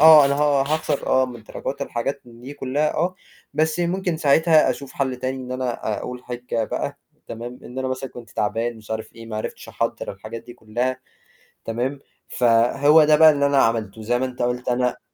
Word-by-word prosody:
آه، 155 -2 +10
أنا 140 0 +2
ه 145 -1 +3
هاخسر 150 0 -1
آه، 130 0 +3
من 120 -3 -9
دراجات - - -5
الحاجات 120 +4 -3
دي 120 +3 -10
كلّها 145 +3 -1
آه، 180 +3 0 0.4
بس 160 +3 +1
ممكن 175 -1 0
ساعتها 155 -1 +4
أشوف 130 +1 -6
حَل 130 -2 -1
تاني 130 +1 -3
إن 125 0 -6
أنا 125 -4 -2
أقول 125 0 -7
حِجّة 120 -2 -3
بقى - - -4 0.3
تمام، 120 +2 -7
إن 125 +2 -8
أنا 130 0 -1
مثلًا 130 0 -4
كنت 120 -3 -11
تعبان، 115 +3 -1
مش 110 -1 -15
عارف 110 0 -4
إيه 115 -1 -11
ما 110 -1 -5
عرفتش 110 - -5
أحضّر - - -2
الحاجات 110 +4 -8
دي 120 - -11
كلّها، 120 +3 -2 0.6
تمام، 125 +5 -2 0.3
فهو 125 +6 +5
ده 150 0 +5
بقى 160 0 +8
اللي 140 -1 +2
أنا 140 -1 +3
عملته 110 -3 +1
زي 120 +3 +1
ما 130 - 0
أنت 125 -1 -5
قُلت 125 +1 -1
أنا 125 0 0
130 Hz, 195 wpm, -23 LUFS, 120-145 Hz, 0.6 s, آه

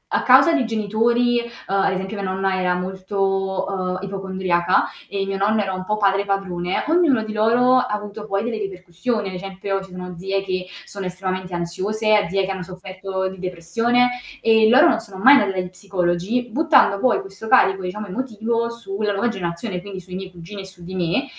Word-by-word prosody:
a - - +2
causa 270 +6 +6
di 280 -6 +2
genitori 230 +3 +1
ehm 235 0 -5 0.2
ad 195 -1 +1
esempio 190 +2 -4
mia 190 - -2
nonna 190 0 0
era 180 -1 +1
molto, 190 +1 -1
uhm, 185 -2 -2
ipocondriaca 190 -2 0 0.2
e 195 -1 -2
mio 195 0 -3
nonno 210 +2 +2
era 190 -2 -2
un 185 0 -5
po' 210 +1 -1
padre 200 -1 +2
padrone, 185 -3 -1
ognuno 320 -9 +3
di 215 0 -6
loro 240 +4 +4
ha 250 0 +2
avuto 210 0 -5
poi 195 +1 -1
delle 230 -2 -3
ripercussioni, 195 +3 -3
ad 185 - -8
esempio 195 +1 -4
ci 190 - -13
sono 180 -1 -7
zie 195 +2 -2
che 185 -1 -3 0.2
sono 200 -2 -7
estremamente 185 0 -4
ansiose, 205 +4 +1
zie 195 +1 +1
che 195 - -3
hanno 190 -1 -4
sofferto 190 +1 -5
di 190 -1 -11
depressione 210 +8 +1 0.3
e 220 -1 +5
loro 275 +8 +7
non 230 - +3
sono 200 -4 -10
mai 270 - +10
andate 200 -2 0
dagli 180 - -3
psicologi 185 +5 -1
buttando 285 -7 +4
poi 255 +1 +3
questo 195 +3 -10
carico 195 -6 +4
diciamo 200 +4 -4
emotivo 230 +1 -2
su 230 -4 -7
la 210 -1 +1
nuova 200 +5 0
generazione 180 -1 -4
quindi 195 -1 -7
sui 185 0 -12
miei 190 0 -6
cugini 180 +3 -9
e - - -9
su 185 -2 -14
di 185 +2 -8
me 175 - 0
195 Hz, 195 wpm, -21 LUFS, 185-220 Hz, 0.3 s, mai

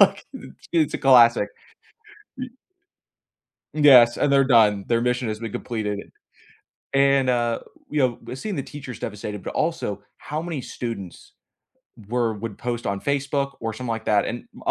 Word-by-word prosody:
like, - - +4
it's - - -12
it's 160 -4 +2
a - - -1
classic. 120 -5 +6 0.9
Y 255 0 -5 1.3
yes, 130 -6 +7
and 140 - +1
they're 135 -1 +5
done, 105 -6 +4
their 115 -1 +2
mission 125 0 0
has 110 - -3
been 115 -2 -6
completed. 105 -4 -4 0.8
And, 135 -1 +4
uh, 120 -2 +1 0.3
you 130 -5 +1
know, - - -6
seeing 200 +10 -4
the 140 - -3
teachers 135 -5 -9
devastated, 105 -2 -6
but - - -5
also - - -2
how 155 +2 -5
many 165 -6 -4
students 105 -10 -7 0.8
were 120 -2 0
would 105 0 -6
post 120 -1 -4
on 100 0 -2
Facebook 140 +1 -1
or 115 -1 -3
something 120 +1 -5
like 115 0 -3
that, 105 -1 +3
and 120 - -5 0.2
a - - +3
120 Hz, 160 wpm, -23 LUFS, 110-140 Hz, 1.3 s, yes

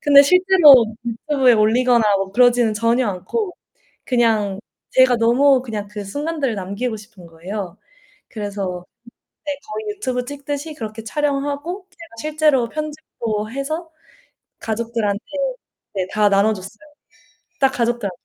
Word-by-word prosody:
근데 280 -1 +7
실제로 330 -6 +6 0.2
유튜브에 255 +1 +2
올리거나 235 +2 +3
뭐 195 0 -3
그러지는 245 -1 +4
전혀 230 +2 +1
않고 360 - -3 0.5
그냥 220 -6 +1 0.3
제가 260 -2 +5
너무 255 +4 +4
그냥 215 -5 -5
그 210 -1 -6
순간들을 285 +2 -2
남기고 200 +5 -3
싶은 210 -4 -14
거예요. 180 +3 -7 0.5
그래서 200 -5 -5 0.6
네, 295 - -2 0.2
거의 425 -1 -5
유튜브 250 -10 -3
찍듯이 285 +3 -5
그렇게 220 -4 -7
촬영하고 290 - -2
제가 335 -3 -14
실제로 300 -5 +2
편집도 240 -9 -4
해서 310 +5 -4 0.7
가족들한테 225 -2 -2 0.7
네, 185 -2 -1
다 210 -1 +3
나눠줬어요. 200 0 0 0.8
딱 270 -1 +4
가족들한테만요. 235 -7 -2
240 Hz, 305 characters per minute, -20 LUFS, 210-285 Hz, 0.8 s, 근데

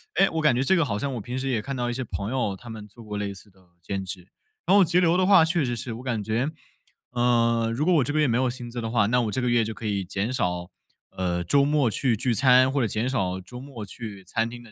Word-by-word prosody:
哎， 195 +1 +4
我 160 - -1
感 150 -5 +4
觉 125 - +1
这 165 +8 +3
个 170 - +3
好 105 -8 -2
像 140 +5 -3
我 115 - -4
平 125 +5 -5
时 135 +1 -3
也 115 -4 0
看 135 +5 -5
到 120 -1 -1
一 - - -2
些 130 +2 -3
朋 100 -1 -4
友， 120 -7 -1
他 120 +5 -12
们 110 -2 -8
做 115 +3 -15
过 105 -1 -5
类 100 -1 -2
似 100 +1 -15
的 95 - -26 0.2
兼 95 +3 -3
职。 95 -1 -6 0.4
然 190 - +5
后 200 - +7
节 175 +1 +2
流 175 -1 +3
的 185 0 +2
话 195 -5 +7
确 165 -1 +1
实 120 -2 -1
是， 115 0 -4
我 115 - -8
感 120 -5 -2
觉， 115 +7 0 0.6
呃， 115 -1 +2
如 145 +5 0
果 180 - +4
我 155 -5 +4
这 145 - -2
个 155 - 0
月 150 - +4
没 115 - +1
有 130 +1 +2
薪 120 -1 -6
资 120 0 -5
的 115 - -3
话， 110 -3 +2
那 125 +4 +2
我 110 -3 -1
这 115 - -1
个 125 - -1
月 120 -1 +3
就 110 0 -5
可 115 - -8
以 100 -2 -1
减 100 +6 -3
少， 90 -6 -2 0.4
呃， 90 -1 -2
周 140 +11 +3
末 145 -2 +2
去 115 +1 +1
聚 125 +2 +1
餐 130 +2 +5
或 140 0 0
者 115 - +1
减 110 +3 -1
少 95 -8 -1
周 125 +7 -10
末 130 -5 -8
去 100 -2 -8
餐 110 +5 -1
厅 120 0 -10
的。 115 - -16
120 Hz, 320 characters per minute, -25 LUFS, 105-130 Hz, 0.6 s, 后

